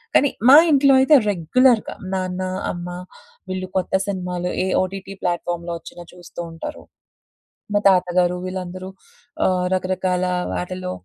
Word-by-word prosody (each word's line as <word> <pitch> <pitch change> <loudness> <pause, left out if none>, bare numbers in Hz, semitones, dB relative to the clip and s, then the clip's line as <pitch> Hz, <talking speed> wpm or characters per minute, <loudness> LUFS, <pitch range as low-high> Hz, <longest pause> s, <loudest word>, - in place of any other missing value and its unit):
కానీ 285 - +5 0.2
మా 280 - +10
ఇంట్లో 275 -1 +5
అయితే 295 +3 +6 0.2
రెగ్యులర్‌గా 220 +7 +2 0.2
నాన్న 185 0 -3 0.3
అమ్మ 175 0 -6 0.6
వీళ్ళు 185 0 -4
కొత్త 185 - -2
సినిమాలు 180 -2 -3
ఏ - - -2 0.2
ఓటీటీ 195 +1 -7
ప్లాట్‌ఫార్మ్‌లో 175 0 -2
వచ్చిన 170 +2 -12
చూస్తూ 175 -1 -12
ఉంటారు. 165 - -8 0.9
మా 205 - +3
తాతగారు 180 -1 +2
వీళ్ళందరూ 185 0 -6 0.6
ఆహ్, 180 -1 +1
రకరకాల 185 0 -1 0.3
వాటిలో 185 0 -4
185 Hz, 120 wpm, -21 LUFS, 180-190 Hz, 0.9 s, మా